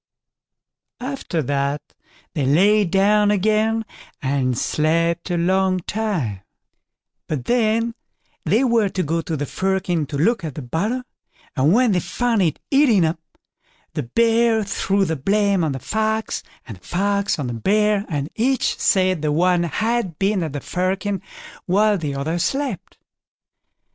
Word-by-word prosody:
After 250 Hz, -, -3 dB
that 140 Hz, +2 st, -2 dB, 0.4 s
they 145 Hz, -6 st, -1 dB
lay 200 Hz, +8 st, +4 dB
down 205 Hz, +3 st, +3 dB
again, 215 Hz, +2 st, +1 dB, 0.3 s
and 130 Hz, -3 st, 0 dB
slept 165 Hz, +5 st, 0 dB
a 175 Hz, -, 0 dB
long 185 Hz, +1 st, +1 dB
time; 175 Hz, -, -2 dB, 0.9 s
but 135 Hz, -6 st, -3 dB
then 230 Hz, -, +1 dB, 0.5 s
they 210 Hz, -, +2 dB
were 230 Hz, -5 st, +2 dB
to 185 Hz, -1 st, -2 dB
go 165 Hz, +2 st, -1 dB
to 160 Hz, -1 st, -4 dB
the 145 Hz, -, -2 dB
firkin 185 Hz, -2 st, -1 dB
to 145 Hz, -, -4 dB
look 205 Hz, +6 st, +1 dB
at 155 Hz, -5 st, -5 dB
the 150 Hz, -, -6 dB
butter, 210 Hz, -, -2 dB, 0.5 s
and 140 Hz, +2 st, +3 dB
when 240 Hz, +3 st, +4 dB
they 180 Hz, -, +2 dB
found 235 Hz, +3 st, 0 dB
it 160 Hz, -5 st, +1 dB
eaten 255 Hz, -, +4 dB
up, 160 Hz, +1 st, -1 dB, 0.7 s
the -, -, -2 dB
Bear 230 Hz, -, +2 dB
threw 200 Hz, 0 st, 0 dB
the 160 Hz, -, -1 dB
blame 200 Hz, +5 st, +1 dB
on 155 Hz, -, 0 dB
the 135 Hz, -, -3 dB
Fox, 220 Hz, -, -1 dB, 0.3 s
and 110 Hz, -6 st, -8 dB
the -, -, -24 dB
Fox 200 Hz, +2 st, 0 dB
on 145 Hz, -, -3 dB
the 120 Hz, -, -3 dB
Bear; 210 Hz, -, +2 dB
and 145 Hz, -4 st, -2 dB
each 255 Hz, +4 st, 0 dB
said 185 Hz, -3 st, +2 dB
the 150 Hz, -1 st, 0 dB
one 175 Hz, +3 st, +3 dB
had 210 Hz, 0 st, -1 dB
been 195 Hz, 0 st, +1 dB
at 160 Hz, -4 st, -3 dB
the 145 Hz, -, -4 dB
firkin 190 Hz, +1 st, -2 dB, 0.5 s
while 205 Hz, +3 st, +3 dB
the 145 Hz, -4 st, -3 dB
other 160 Hz, +5 st, -2 dB
slept. 270 Hz, -, -2 dB
190 Hz, 150 wpm, -21 LUFS, 155-215 Hz, 0.9 s, lay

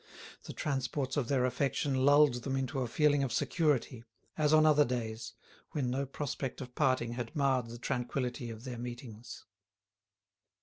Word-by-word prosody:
The -, -, -7 dB
transports 135 Hz, -1 st, -2 dB
of 140 Hz, -5 st, 0 dB
their 130 Hz, -2 st, +2 dB
affection 140 Hz, +2 st, 0 dB
lulled 135 Hz, -1 st, +5 dB
them 135 Hz, +2 st, -2 dB
into 135 Hz, 0 st, -2 dB
a 125 Hz, -, -1 dB
feeling 145 Hz, +3 st, +3 dB
of 135 Hz, -3 st, -1 dB
security, 130 Hz, -3 st, 0 dB, 0.3 s
as 150 Hz, -1 st, +2 dB
on 155 Hz, 0 st, +6 dB
other 150 Hz, -1 st, +6 dB
days, 115 Hz, -3 st, -4 dB, 0.4 s
when 130 Hz, -5 st, -1 dB
no 135 Hz, +2 st, -1 dB
prospect 135 Hz, -1 st, -4 dB
of 125 Hz, -2 st, -8 dB
parting 130 Hz, -5 st, +1 dB
had 120 Hz, -1 st, -5 dB
marred 135 Hz, -4 st, +2 dB
the 115 Hz, +1 st, -8 dB
tranquility 125 Hz, 0 st, -2 dB
of 115 Hz, 0 st, -8 dB
their 125 Hz, -2 st, -6 dB
meetings. 120 Hz, -2 st, -8 dB
130 Hz, 160 wpm, -32 LUFS, 120-140 Hz, 0.4 s, on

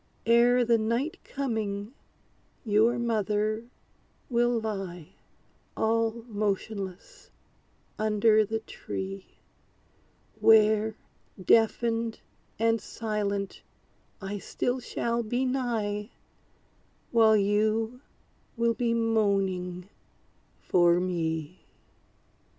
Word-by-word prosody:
Ere 240 Hz, +1 st, +5 dB
the 230 Hz, -1 st, +3 dB
night 235 Hz, +8 st, -1 dB
coming, 220 Hz, -5 st, -3 dB, 0.7 s
your 225 Hz, +3 st, +3 dB
mother 215 Hz, -1 st, 0 dB, 0.7 s
will 240 Hz, 0 st, +2 dB
lie, 195 Hz, -7 st, -5 dB, 0.7 s
All 225 Hz, +1 st, 0 dB
motionless, 205 Hz, -3 st, -4 dB, 0.7 s
under 215 Hz, 0 st, +4 dB
the 220 Hz, +1 st, -3 dB
tree; 195 Hz, -3 st, -6 dB, 1.1 s
Where, 220 Hz, 0 st, +5 dB, 0.4 s
deafened, 225 Hz, +3 st, +2 dB, 0.4 s
and 225 Hz, 0 st, +2 dB
silent, 205 Hz, -3 st, -3 dB, 0.6 s
I 200 Hz, +1 st, -5 dB
still 245 Hz, +5 st, -2 dB
shall 235 Hz, -1 st, -2 dB
be 245 Hz, +3 st, -1 dB
nigh, 225 Hz, -5 st, -2 dB, 1.0 s
While 220 Hz, -2 st, +5 dB
you 215 Hz, +4 st, +1 dB, 0.6 s
will 235 Hz, 0 st, +2 dB
be 235 Hz, 0 st, 0 dB
moaning 195 Hz, -5 st, 0 dB, 0.7 s
for 175 Hz, -1 st, +3 dB
me! 165 Hz, -2 st, -3 dB
220 Hz, 75 wpm, -28 LUFS, 200-230 Hz, 1.1 s, Ere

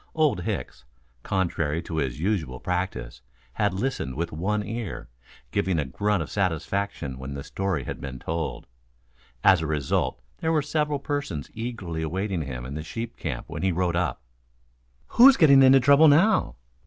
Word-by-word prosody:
Old 155 Hz, -, +2 dB
Hicks, 65 Hz, +1 st, -4 dB, 0.4 s
contrary 80 Hz, -4 st, -1 dB
to 80 Hz, -1 st, -5 dB
his 65 Hz, -4 st, -2 dB
usual 80 Hz, -9 st, -1 dB
practice, 90 Hz, -9 st, -3 dB, 0.3 s
had 105 Hz, +1 st, 0 dB
listened 95 Hz, -, -2 dB
with 85 Hz, +2 st, -3 dB
one 105 Hz, +7 st, -1 dB
ear, 115 Hz, -4 st, -5 dB, 0.4 s
giving 95 Hz, -3 st, 0 dB
a 75 Hz, -, 0 dB
grunt 100 Hz, +7 st, 0 dB
of -, -, -10 dB
satisfaction 95 Hz, -5 st, -2 dB
when 70 Hz, +1 st, -6 dB
the 70 Hz, -, -5 dB
story 95 Hz, -5 st, -2 dB
had -, -, -6 dB
been 65 Hz, -2 st, -6 dB
told. 80 Hz, +4 st, -4 dB, 0.8 s
As -, -, +6 dB
a 80 Hz, -, -2 dB
result 75 Hz, -3 st, -1 dB, 0.2 s
there 160 Hz, -, 0 dB
were 155 Hz, -3 st, +2 dB
several 150 Hz, 0 st, 0 dB
persons 140 Hz, -, -4 dB
eagerly 110 Hz, -8 st, -5 dB
awaiting 95 Hz, +3 st, -2 dB
him 65 Hz, -4 st, -5 dB
in 65 Hz, -, -6 dB
the 75 Hz, -, -4 dB
sheep 115 Hz, +9 st, -6 dB
camp 70 Hz, -7 st, -5 dB
when -, -, -6 dB
he 95 Hz, -, +2 dB
rode 90 Hz, 0 st, 0 dB
up. 90 Hz, -8 st, -1 dB, 0.8 s
"Who's 260 Hz, +2 st, +7 dB
getting 140 Hz, -4 st, +7 dB
into 135 Hz, 0 st, +7 dB
trouble 140 Hz, +4 st, +6 dB
now?" 180 Hz, +8 st, +4 dB
90 Hz, 165 wpm, -25 LUFS, 75-115 Hz, 0.8 s, Who's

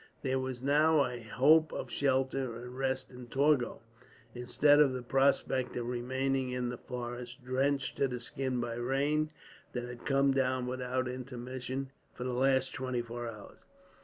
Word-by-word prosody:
There 130 Hz, -1 st, +1 dB
was 130 Hz, -1 st, -4 dB
now 150 Hz, +1 st, +4 dB
a 125 Hz, -1 st, -5 dB
hope 150 Hz, +8 st, +4 dB
of -, -, -5 dB
shelter 130 Hz, -2 st, 0 dB
and 125 Hz, +2 st, -8 dB
rest 130 Hz, 0 st, -1 dB
in 125 Hz, -1 st, -10 dB
Torgau, 135 Hz, -2 st, +2 dB, 0.5 s
instead 125 Hz, +4 st, +4 dB
of 140 Hz, -3 st, +5 dB
the 125 Hz, -1 st, -4 dB
prospect 135 Hz, 0 st, +2 dB
of 120 Hz, -, -2 dB
remaining 130 Hz, +2 st, -1 dB
in 125 Hz, -1 st, -2 dB
the 125 Hz, -, -4 dB
forest, 120 Hz, 0 st, -6 dB
drenched 135 Hz, +2 st, 0 dB
to 140 Hz, -, +3 dB
the 125 Hz, -1 st, -4 dB
skin 130 Hz, +1 st, -2 dB
by 120 Hz, -1 st, -3 dB
the -, -, -3 dB
rain 145 Hz, +5 st, +1 dB, 0.4 s
that 125 Hz, -, -2 dB
had 120 Hz, -1 st, -8 dB
come 135 Hz, -1 st, +4 dB
down, 130 Hz, -1 st, +1 dB
without 130 Hz, 0 st, -2 dB
intermission, 130 Hz, +1 st, -5 dB, 0.2 s
for -, -, -5 dB
the 125 Hz, 0 st, -2 dB
last 130 Hz, +1 st, +2 dB
twenty 130 Hz, -2 st, -2 dB
four 120 Hz, 0 st, -5 dB
hours. 105 Hz, -3 st, -11 dB
130 Hz, 165 wpm, -32 LUFS, 125-135 Hz, 0.5 s, of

